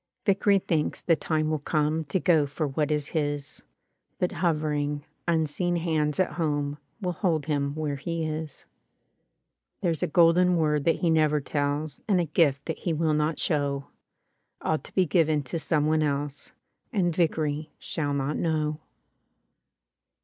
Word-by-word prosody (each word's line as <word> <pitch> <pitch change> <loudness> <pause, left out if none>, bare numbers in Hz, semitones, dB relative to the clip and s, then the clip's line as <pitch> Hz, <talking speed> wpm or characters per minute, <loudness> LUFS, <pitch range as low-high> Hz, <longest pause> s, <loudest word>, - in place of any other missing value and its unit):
Vickery 200 0 +4
thinks 165 -5 0
the 165 - +3
time 155 -1 -1
will 155 - 0
come 155 +2 0
To 145 +6 0
go 160 -5 +3
for 150 +2 -2
what 145 +2 -1
is 150 -1 -1
his; 145 -3 -3 0.6
But 180 - 0
hovering, 150 -3 -1 0.2
unseen 170 +2 +1
hands 160 -3 0
at 185 - +2
home 145 -3 -1 0.2
Will 180 -2 0
hold 165 -4 0
him 145 -2 -1
where 150 -2 -2
he 165 +3 -3
is. 155 -1 -5 1.2
There's 170 -5 0
a - - +1
golden 175 +2 +4
word 150 -3 +1
that 165 - +2
he 170 - +3
never 155 -2 +3
tells 145 +1 -2
And 195 -4 +3
a 175 - +1
gift 145 -3 +2
that 160 - -4
he 170 - -1
will 160 0 +1
not 150 +1 +1
show. 140 -3 -1 0.7
All 155 - 0
to - - -15
be 185 - +4
given 155 -2 +2
to 150 +6 -4
some 150 -1 +1
one 155 0 +2
else 145 -1 -2 0.2
— - - -49
And 180 -7 +1
Vickery 155 -3 0
shall 145 -3 -2
not 140 +2 -1
know. 155 -2 0
155 Hz, 160 wpm, -27 LUFS, 145-165 Hz, 1.2 s, Vickery